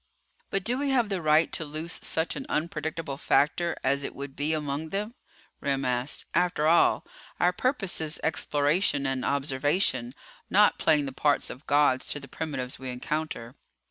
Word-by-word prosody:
"But 195 - -1
do 245 +5 0
we 285 0 0
have 245 -5 +2
the 195 -3 -1
right 155 +1 +4
to - - -1
loose 155 +3 -4
such 160 +1 -1
an 270 - -6
unpredictable 155 -2 -3
factor 170 +5 +1
as 140 +2 +2
it - - -5
would 140 0 -7
be 145 +2 -1
among 150 0 -2
them?" 210 +5 -3 0.5
Remm 135 -1 -1
asked. 125 +2 0
"After 175 -4 +1
all, 165 +2 +4 0.3
our 180 +1 +3
purpose 210 - 0
is 155 0 0
exploration 145 0 +1
and 135 -1 -1
observation, 135 -2 0 0.3
not 210 +2 +4
playing 150 -3 +3
the 135 - -4
parts 145 +2 +1
of 130 - -12
gods 145 -3 +3
to 145 - -5
the 140 - -11
primitives 135 -3 -3
we 130 -1 -6
encounter." 125 -1 -4
150 Hz, 170 wpm, -27 LUFS, 140-170 Hz, 0.5 s, right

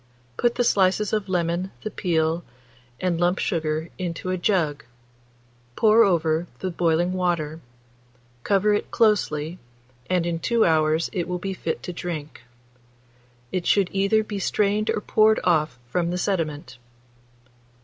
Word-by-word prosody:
Put 240 - +1
the 245 - +2
slices 200 -1 +2
of 210 -3 -1
lemon, 175 +1 0
the 215 - -4
peel, 165 -2 0 0.6
and 180 -2 0
lump 175 +1 +2
sugar 160 -1 -1
into 180 0 -3
a - - +1
jug; 160 -7 0 0.9
pour 225 +1 +5
over 165 -3 +1
the 185 - -3
boiling 170 +1 +1
water; 170 -4 -1 0.8
cover 205 +6 +2
it 205 - -1
closely, 180 -7 +1 0.5
and 180 -2 +1
in 170 -1 -2
2 230 +6 +2
hours 160 0 +2
it 175 -4 -2
will 180 0 -2
be 195 +2 -4
fit 165 -3 -4
to 180 - -5
drink. 165 -4 -6 1.1
It 180 -2 -2
should 195 -3 +3
either 200 +3 +2
be 210 -2 -5
strained 210 +2 0
or 210 - 0
poured 215 +1 +3
off 155 -7 +1
from 170 +7 -1
the 180 - -2
sediment. 155 -9 -2
180 Hz, 140 wpm, -24 LUFS, 165-200 Hz, 1.1 s, pour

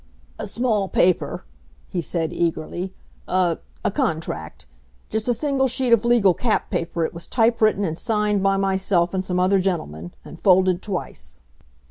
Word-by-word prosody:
"A - - -4
small 215 -2 0
paper," 180 -1 +1 0.4
he 175 - -3
said 165 -1 -2
eagerly. 170 +2 -2 0.4
"A 180 -3 +1 0.3
a - - +2
contract 160 - -3 0.5
just 220 +1 -2
a 245 - +3
single 270 +1 +1
sheet 250 -1 +1
of 230 -1 +4
legal 235 -6 +4
cap 225 +4 -1
paper 170 -3 -1
it - - -5
was 170 0 -7
type 230 -1 +2
written 215 -2 +3
and 160 -3 -2
signed 210 0 0
by 195 0 +2
myself 190 -2 +1
and 190 0 -1
some 180 -1 -1
other 190 +2 +3
gentlemen, 90 - -3
and 170 - -11
folded 185 -1 +4
twice." 65 - -6
190 Hz, 160 wpm, -22 LUFS, 170-215 Hz, 0.5 s, of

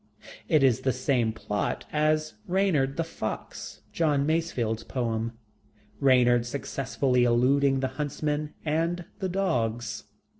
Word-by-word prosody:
It 155 -3 +4
is 130 -5 +4
the 130 - 0
same 125 -3 +1
plot 105 -2 -3
as 155 -1 +1
Reynard 175 -8 +1
the 165 - +1
Fox, 135 -9 -6
John 150 -4 +2
Masefield's 145 -9 0
poem 115 -2 -2 0.7
Reynard 125 -3 +4
successfully 130 -1 0
eluding 135 +3 +3
the 130 - +1
huntsmen 150 +1 -2
and 165 +3 0
the 190 - -1
dogs. 115 - -1
135 Hz, 115 wpm, -27 LUFS, 120-155 Hz, 0.7 s, It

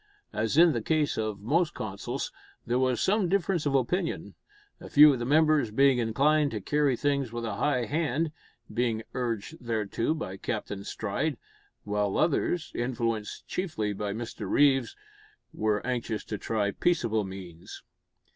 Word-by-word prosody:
As 110 +6 -1
in 170 0 +7
the 120 -5 -1
case 155 +4 +1
of 110 -2 -3
most 155 - +1
councils, 100 -2 -4 0.3
there 120 +1 +1
was 130 -2 +1
some 200 -2 +2
difference 185 -4 +1
of 140 - +1
opinion: 165 +7 -1 0.5
a - - -10
few 150 0 +8
of 130 - -3
the 120 - -3
members 155 -3 +4
being 135 +3 +4
inclined 145 +6 +2
to 110 - -4
carry 145 +5 +1
things 140 -2 0
with 120 0 -4
a 105 -3 -3
high 125 -1 +1
hand 155 +1 0 0.4
being 115 -2 0
urged 120 +5 -3
thereto 115 +4 -1
by 95 -11 -5
Captain 100 +1 -4
Stride 115 +9 -2 0.5
while 105 -1 -1
others, 165 +1 +1
influenced 115 -3 -2
chiefly 110 - -2
by 100 0 -3
Mr 110 -2 -5
Reeves, 135 -4 +3 0.6
were 105 -1 0
anxious 120 -4 -2
to 105 - -5
try 105 -1 0
peaceable 115 - +1
means. 95 -3 -9
120 Hz, 150 wpm, -28 LUFS, 110-150 Hz, 0.6 s, few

